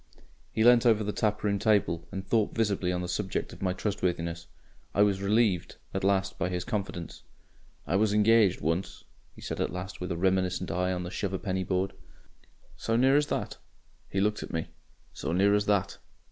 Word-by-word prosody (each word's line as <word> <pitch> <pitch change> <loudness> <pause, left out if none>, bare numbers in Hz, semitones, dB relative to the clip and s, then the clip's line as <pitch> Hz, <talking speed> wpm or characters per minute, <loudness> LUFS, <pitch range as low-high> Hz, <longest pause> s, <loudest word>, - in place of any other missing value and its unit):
He 110 - +1
leant 120 0 +7
over 110 -2 +4
the 105 - -1
taproom 105 -1 0
table 100 -6 +1
and 95 0 -5
thought 110 -1 +1
visibly 100 -5 +1
on 90 0 -2
the - - -3
subject 95 +2 -3
of - - -13
my 95 -1 +1
trustworthiness. 85 -4 -2 0.5
I 100 - +6
was 100 -2 +1
relieved 100 -3 +1 0.2
at 95 - -2
last 95 0 +1
by 95 - 0
his 90 -1 -2
confidence. 95 -6 -4 0.6
"I 95 - +1
was 105 0 +2
engaged 105 -2 +4
once," 85 +5 -2 0.3
he - - -13
said - - -4
at - - -1
last, 90 +1 -6
with 90 - -3
a 85 - -2
reminiscent 95 0 0
eye 90 +2 0
on 90 -1 -2
the 90 - -6
shuv 95 -1 -3
a'penny 95 -1 -2
board. 95 +1 -1 0.8
"So 115 - -1
near 130 +3 +4
as 145 0 +3
that?" - - -3 0.5
He 95 - -1
looked 105 +2 +1
at - - -7
me. 80 -2 -3 0.4
"So 80 - -3
near 100 +3 +4
as 105 0 +1
that. 100 -3 +1
95 Hz, 190 wpm, -28 LUFS, 90-105 Hz, 0.8 s, leant